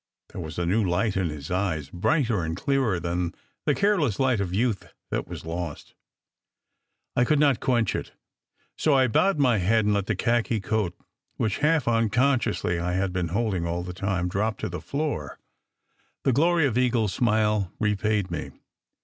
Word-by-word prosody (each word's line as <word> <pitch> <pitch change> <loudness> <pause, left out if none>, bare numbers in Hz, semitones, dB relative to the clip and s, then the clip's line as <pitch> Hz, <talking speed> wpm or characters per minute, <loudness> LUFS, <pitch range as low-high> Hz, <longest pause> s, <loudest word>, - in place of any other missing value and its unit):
There - - -7
was 80 -2 -7
a 90 - 0
new 105 +6 +2
light 95 +3 0
in 95 -3 0
his 75 0 -7
eyes, 90 -6 -1
brighter 115 - +1
and 80 +1 -3
clearer 130 -7 +1
than 85 0 -2 0.3
the - - +3
careless 185 - +1
light 130 -5 +2
of 95 -3 -2
youth 110 +1 -1 0.2
that - - -2
was - - -8
lost. 85 -2 -5 1.2
I 125 - +4
could 150 +5 +2
not 140 -4 +3
quench 120 -5 +1
it. - - -4 0.6
So 150 -3 +2
I 130 -1 +5
bowed 190 - +2
my 125 -7 +3
head 110 +4 +2
and 105 - +3
let 100 -1 0
the 110 - 0
khaki 115 +2 +1
coat, 100 -3 -1 0.4
which 110 -3 -1
half 150 -2 +2
uncon 120 +4 +3
sciously 90 -6 -1
I 90 +1 -1
had 95 0 0
been 90 -2 -1
holding 95 -2 -1
all 85 +1 -2
the 90 0 -6
time, 95 -1 -1
drop 105 +4 -1
to - - -2
the 90 - -5
floor. 140 - -3 0.9
The 135 - +3
glory 165 +4 +3
of 125 -3 +1
Eagle 125 -2 +2
s 105 - -1
smile 105 -5 +1
repaid 105 -2 0
me. 85 - -4
105 Hz, 185 wpm, -26 LUFS, 90-125 Hz, 1.2 s, I